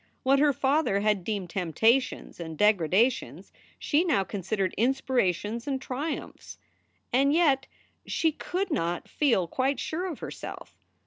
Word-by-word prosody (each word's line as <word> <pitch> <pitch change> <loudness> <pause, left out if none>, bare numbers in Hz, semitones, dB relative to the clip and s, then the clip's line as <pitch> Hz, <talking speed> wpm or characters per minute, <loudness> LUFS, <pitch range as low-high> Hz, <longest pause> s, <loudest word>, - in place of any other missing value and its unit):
What 275 +1 +4
her 295 0 +5
father 270 -6 +1
had 210 -3 +1
deemed 195 -3 -3
temptations 220 - +1
and 160 -2 -6
degradations 210 - +1 0.2
she 305 +3 +1
now 300 - +2
considered 190 0 -2
inspirations 235 - 0
and 270 -2 -1
triumphs. 275 +4 -5 0.6
And 275 +3 +4
yet 280 -6 +3 0.4
she 320 - +1
could 365 +4 -3
not 175 - -1
feel 235 - +1
quite 265 +7 0
sure 350 +4 -3
of 330 -7 -5
herself. - - -8
250 Hz, 130 wpm, -27 LUFS, 195-285 Hz, 0.6 s, her